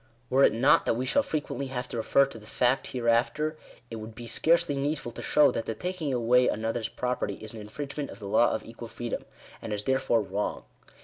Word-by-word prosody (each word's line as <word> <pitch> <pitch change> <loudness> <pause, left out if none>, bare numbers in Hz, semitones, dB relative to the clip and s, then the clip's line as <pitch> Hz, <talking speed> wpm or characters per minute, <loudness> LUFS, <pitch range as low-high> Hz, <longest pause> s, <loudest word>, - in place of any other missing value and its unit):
Were 135 +2 +5
it - - +7
not 120 +6 +4
that - - +3
we 125 +2 -2
shall 280 - +3
frequently 150 - -3
have 125 -1 -4
to 120 - -4
refer 140 +5 +4
to 135 -4 -10
the 105 - -15
fact 125 +3 +1
hereafter, 125 +6 +1 0.4
it 115 - -4
would 110 0 -8
be 120 - -8
scarcely 165 +7 +2
needful 140 -2 -2
to - - -8
show 145 -3 +4
that 115 - -3
the 115 - -2
taking 180 -1 -3
away 125 0 +4
another's 110 +1 -1
property 125 0 -2
is 110 0 -9
an 110 - -8
infringement 140 +6 -5
of - - -9
the 105 -2 -8
law - - +4
of - - -3
equal - - -9
freedom, - - -5 0.4
and 110 - -6
is 105 0 -3
therefore 130 -3 +2
wrong. 100 +1 -3
125 Hz, 220 wpm, -28 LUFS, 115-140 Hz, 0.4 s, it